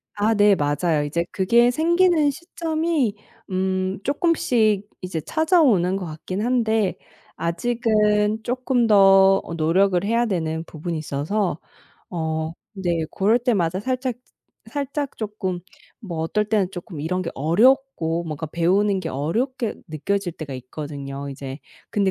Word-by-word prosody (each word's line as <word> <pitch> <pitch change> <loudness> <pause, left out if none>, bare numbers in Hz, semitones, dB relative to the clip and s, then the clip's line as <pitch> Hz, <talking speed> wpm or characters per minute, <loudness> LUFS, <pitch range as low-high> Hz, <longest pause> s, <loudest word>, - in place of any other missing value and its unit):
아 210 +2 +2
네. 205 -1 +5
맞아요. 150 +1 +1
이제 170 +3 -1
그게 235 +6 +4
생기는 335 +1 +3
시점이 320 - -1 0.3
음 185 0 -1
쪼끔씩 240 - +1
이제 180 -4 -4
찾아오는 280 - +3
것 190 -2 -3
같긴 170 +5 -5
한데 225 -5 +1 0.4
아직은 210 +3 +1
쪼끔 250 -1 +1
더 195 -1 +6
어 170 - -7
노력을 180 +3 +2
해야 230 +3 +2
되는 160 -6 -2
부분이 165 +1 -5
있어서 155 +4 -2 0.5
어 160 -2 -2 0.2
네 175 -4 -1
고럴 215 +5 +2
때마다 190 -7 0
살짝 255 +1 -2 0.6
살짝 285 0 -3
쪼끔 205 -5 -3 0.4
뭐 175 -8 -6
어떨 210 +6 0
때는 205 -4 +1
쪼끔 175 -4 -8
이런 180 +5 -1
게 170 - -3
어렵고 170 - +2
뭔가 155 0 -4
배우는 190 +5 +2
게 165 -3 -4
어렵게 225 - -1
느껴질 175 +4 -2
때가 145 -5 -7
있거든요. 140 +1 -6
이제 135 0 -7 0.3
근데 200 -2 +1
195 Hz, 265 characters per minute, -23 LUFS, 165-235 Hz, 0.6 s, 더